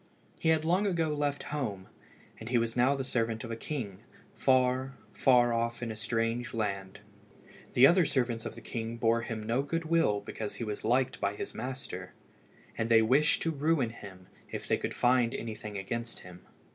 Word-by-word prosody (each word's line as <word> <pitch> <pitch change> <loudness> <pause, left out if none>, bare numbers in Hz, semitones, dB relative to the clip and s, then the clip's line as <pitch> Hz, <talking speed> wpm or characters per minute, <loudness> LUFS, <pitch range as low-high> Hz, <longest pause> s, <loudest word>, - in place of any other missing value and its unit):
He 160 - +1
had 160 -1 +3
long 185 +5 +2
ago 165 -4 +1
left 145 -1 -1
home, 105 -10 -3 0.5
and 110 - -7
he 125 - +3
was 115 0 0
now 125 +3 +4
the 135 - -2
servant 115 -3 -1
of 115 - -6
a - - -2
king, 115 -7 -5 0.3
far, 130 0 +2 0.2
far 120 -2 +4
off 115 +1 -1
in 115 - -3
a - - -6
strange 115 +2 -1
land. 100 -3 -3 0.7
The 125 - +7
other 175 +5 +6
servants 120 -6 0
of - - -6
the - - -10
king 115 0 -4
bore 115 0 +2
him 110 -1 -5
no 115 +4 +1
good 165 +4 -2
will 160 -11 +2
because 105 +1 -5
he - - -5
was 105 -2 -4
liked 125 +3 +1
by 100 0 0
his - - -5
master, 125 -7 -5 0.6
and 115 0 -1
they 115 -1 +6
wished 140 +7 +3
to 165 - +1
ruin 145 -5 +1
him 95 -5 -11 0.2
if - - -6
they - - +2
could - - -4
find 120 -1 +3
anything 105 -2 -5
against 115 +4 -4
him. 90 0 -13
120 Hz, 190 wpm, -30 LUFS, 110-135 Hz, 0.7 s, The